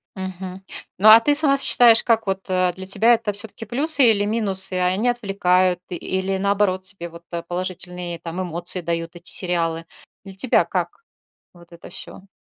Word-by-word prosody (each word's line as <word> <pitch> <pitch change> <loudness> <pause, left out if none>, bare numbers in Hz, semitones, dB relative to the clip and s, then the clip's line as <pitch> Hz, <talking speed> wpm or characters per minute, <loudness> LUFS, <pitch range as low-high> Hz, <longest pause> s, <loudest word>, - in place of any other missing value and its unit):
Мгм. 190 0 -7 0.3
Ну, 210 +4 +5
а 220 +1 +10
ты 290 +5 +1
сама 285 -2 +2
считаешь, 235 -4 +5
как 225 -1 +1
вот, 195 0 -4
э, 185 -1 +1
для 190 - -9
тебя 210 +5 +4
это 225 -3 -1
всё-таки 210 +2 -7
плюсы 275 +3 +3
или 205 -2 +1
минусы, 200 -4 -1
а 180 0 +1
они 205 +7 0
отвлекают 185 -6 +1
или, 190 +2 -3
наоборот, 200 -1 0
тебе 185 -2 -6
вот 170 +1 -14 0.2
положительные 180 -1 -4
там 170 +3 -6
эмоции 175 +1 -1
дают 165 +1 -4
эти 175 +1 -3
сериалы? 165 -2 -1 0.4
Для 195 - -10
тебя 225 +6 +1
как - - -4 0.5
вот 170 -1 -19
это 170 - -13
всё? 195 - -10
190 Hz, 170 wpm, -21 LUFS, 180-215 Hz, 0.5 s, а